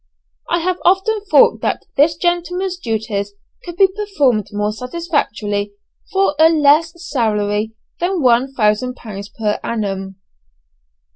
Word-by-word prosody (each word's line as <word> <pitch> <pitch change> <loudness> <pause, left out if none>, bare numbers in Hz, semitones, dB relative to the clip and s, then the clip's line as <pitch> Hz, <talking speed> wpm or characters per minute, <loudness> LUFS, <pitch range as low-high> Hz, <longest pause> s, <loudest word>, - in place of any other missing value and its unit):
I 345 - +1
have 365 +1 -1
often 390 +4 +2
thought - - +5
that - - -2
this 305 +3 +4
gentleman's 355 +2 -1
duties 215 - -3 0.3
could 345 -1 -8
be 390 - +7
performed 320 - 0
more 210 0 -1
satisfactorily 215 -7 -2 0.4
for 390 -5 +2
a 320 +1 +7
less 310 +1 +4 0.2
salary 215 -3 -1 0.2
than 360 +1 0
one 250 +2 +3
thousand 235 +1 +1
pounds 200 -4 -8
per 210 0 -2
annum! 195 -4 -3
255 Hz, 125 wpm, -18 LUFS, 210-345 Hz, 0.4 s, be